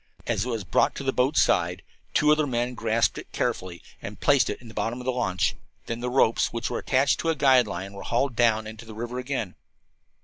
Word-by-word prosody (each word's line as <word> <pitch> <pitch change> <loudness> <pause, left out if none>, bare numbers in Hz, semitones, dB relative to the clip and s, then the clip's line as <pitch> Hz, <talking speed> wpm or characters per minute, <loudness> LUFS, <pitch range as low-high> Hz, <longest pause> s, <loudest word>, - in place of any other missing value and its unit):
As 100 - 0
it - - -4
was 115 -4 -2
brought 90 - +2
to - - -5
the 135 -1 0
boat's 130 +4 +2
side 90 +1 +1 0.3
two 150 0 +4
other 150 -1 +3
men 120 -1 -1
grasped 115 -1 +1
it - - -12
carefully 90 -2 -3 0.2
and 100 +1 -8
placed 140 -2 +3
it - - -4
in 120 - -14
the 110 - -11
bottom 115 +3 -2
of 125 - -8
the 130 - +1
launch. 115 -8 0 0.3
Then 115 - -4
the 125 +1 -2
ropes, 125 -3 +2
which 115 -1 -3
were - - -2
attached 135 +1 +2
to 165 - -1
a 165 - +2
guide 130 -5 +4
line, 95 0 -5
were 100 - -8
hauled 120 +3 0
down 110 -2 +3
into 110 +1 -9
the 110 -1 -10
river 120 +3 -4
again. 125 -7 -3
120 Hz, 235 wpm, -26 LUFS, 110-130 Hz, 0.3 s, two